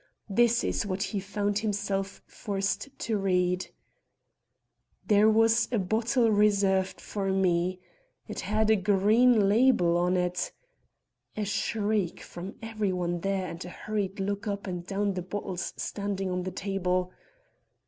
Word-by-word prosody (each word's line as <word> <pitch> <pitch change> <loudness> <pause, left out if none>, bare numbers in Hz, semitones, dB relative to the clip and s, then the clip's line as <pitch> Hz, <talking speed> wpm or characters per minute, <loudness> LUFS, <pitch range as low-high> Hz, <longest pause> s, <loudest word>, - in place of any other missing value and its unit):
This 235 +3 +3
is - - 0
what 195 -1 -2
he 205 +1 -2
found 205 +1 -1
himself 200 -2 -2
forced 200 +4 -3
to 220 -3 -1
read: 180 -1 +1 1.4
"There 210 0 +5
was 225 +1 +4
a 240 - +1
bottle 225 +4 +2
reserved 200 -2 +2
for 195 -2 -3
me. 185 -1 +1 0.5
It - - -6
had 215 +1 +1
a - - +6
green 210 +3 +4
label 205 -6 +4
on 180 +1 +2
it, 180 0 -1 0.4
" - - -39
A 210 - -1
shriek 205 -2 -1
from 180 +3 -8
every 215 -3 -1
one 175 -1 -1
there 195 +1 -1
and 170 0 -6
a 180 - -8
hurried 205 0 -3
look 200 +2 -2
up 200 -1 -3
and 180 -3 -4
down 200 +1 0
at 195 - -2
the - - -1
bottles 185 -1 -4
standing 200 -2 -3
on 180 0 -1
the 185 +1 -4
table. 185 -1 -1
200 Hz, 150 wpm, -28 LUFS, 185-215 Hz, 1.4 s, a